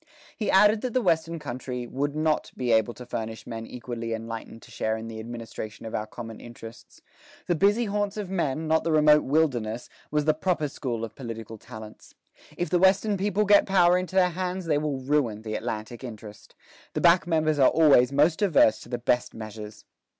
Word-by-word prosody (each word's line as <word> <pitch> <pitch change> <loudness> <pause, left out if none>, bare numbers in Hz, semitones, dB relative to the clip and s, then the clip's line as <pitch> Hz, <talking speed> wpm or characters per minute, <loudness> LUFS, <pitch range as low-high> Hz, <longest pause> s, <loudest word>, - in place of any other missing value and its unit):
He 215 - -2
added 210 +2 +5
that 255 -2 -4
the 255 - +3
Western 165 -1 +1
country 125 -3 -5
"would 140 +4 -3
not 155 0 0
be 125 -2 -1
able 110 +1 +2
to 125 - -10
furnish 110 -2 -5
men 115 -1 -6
equally 115 -2 -5
enlightened 115 0 -8
to - - -15
share 110 0 -1
in 110 0 -7
the 110 -1 -7
administration 115 -1 -7
of 110 - -7
our 105 - -2
common 115 0 -8
interests. 115 -1 -12 0.4
The 175 - +1
busy 205 +7 +3
haunts 205 0 -2
of 205 -2 -3
men, 160 -4 -2
not 160 0 +2
the 165 - 0
remote 150 -1 +6
wilderness, 125 -7 0 0.2
was 150 -1 0
the 155 - +4
proper 155 -1 -1
school 120 -6 -4
of 110 - -11
political 115 -3 -8
talents. 110 -2 -12 0.4
If 175 - -2
the 180 - +3
Western 195 +3 +3
people 205 +2 0
get 205 0 +5
power 180 -2 +5
into 185 +1 -2
their 185 -1 +5
hands, 185 +1 -3
they 150 -3 +1
will 150 -2 -2
ruin 130 -5 0
the 110 -1 -5
Atlantic 110 +2 -5
interest. 110 -4 -10 0.4
The - - -2
back 170 -1 +5
members 155 -3 +1
are 135 - +7
always 140 -6 +5
most 150 +5 +3
averse 175 - +4
to - - -13
the 120 - -2
best 120 +1 0
measures." 110 -1 -9
140 Hz, 195 wpm, -26 LUFS, 115-175 Hz, 0.4 s, are